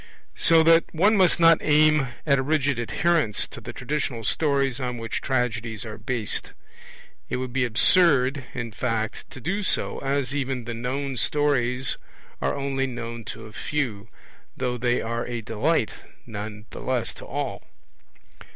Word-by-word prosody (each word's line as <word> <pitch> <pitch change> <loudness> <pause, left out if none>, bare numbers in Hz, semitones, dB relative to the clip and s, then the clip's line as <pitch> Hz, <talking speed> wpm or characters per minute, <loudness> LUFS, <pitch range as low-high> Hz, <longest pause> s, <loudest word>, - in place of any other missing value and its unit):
So 165 0 +6
that 165 +1 +6
one 205 +7 +4
must 185 -4 +4
not 165 -1 +7
aim 150 -2 +4 0.2
at 140 -3 +3
a - - +2
rigid 140 -2 +1
adherence 150 -1 +1
to - - -11
the - - -7
traditional 125 -3 -3
stories 140 0 +1
on 125 -2 -3
which 115 -1 -4
tragedies 115 -4 -1
are 110 0 -7
based. 110 0 -2 0.8
It - - -1
would 125 -1 -4
be 135 -1 +2
absurd, 135 +2 +4
in 120 -2 -4
fact, 110 -1 -3
to - - -9
do 190 - -2
so, 200 - 0
as 140 -1 -1
even 135 -3 -2
the 120 - -4
known 130 +3 -3
stories 130 -2 +1 0.4
are - - 0
only 135 -1 -1
known 115 -2 -6
to 115 0 -7
a 110 - -12
few, 115 -9 -3 0.5
though 125 -1 -1
they 120 0 +1
are 115 +1 -3
a 120 -1 -3
delight 115 +3 0 0.3
none 105 0 -7
the - - -8
less 130 -3 -1
to - - -11
all. - - -3
130 Hz, 160 wpm, -25 LUFS, 115-145 Hz, 0.8 s, not